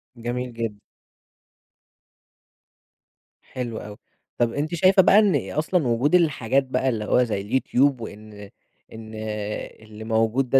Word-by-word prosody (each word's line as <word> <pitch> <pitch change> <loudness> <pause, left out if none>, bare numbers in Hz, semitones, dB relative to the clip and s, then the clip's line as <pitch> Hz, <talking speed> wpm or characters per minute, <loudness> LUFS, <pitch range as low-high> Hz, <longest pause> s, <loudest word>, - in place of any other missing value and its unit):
جميل 120 +1 -4
جدًا. 115 -2 -3 2.7
حلو 120 -3 -6
أوي. 105 0 -9 0.4
طََب 120 -1 +1
أنتِ 155 +4 -2
شايفة 185 +3 +5
بقى 195 +3 +6
إن 205 -3 +1
أصلًا 155 -1 0
وجود 125 +8 +2
الحاجات 140 -6 +2
بقى 130 0 -1
اللي 110 -4 -2
هو 125 +4 +3
زي 105 -4 -2
اليوتيوب 130 +3 +1
وإن 110 -1 -9 0.6
إن 110 -1 -10 0.7
اللي 110 0 -11
موجود 115 +3 +1
ده 135 - +5
125 Hz, 125 wpm, -23 LUFS, 110-140 Hz, 2.7 s, بقى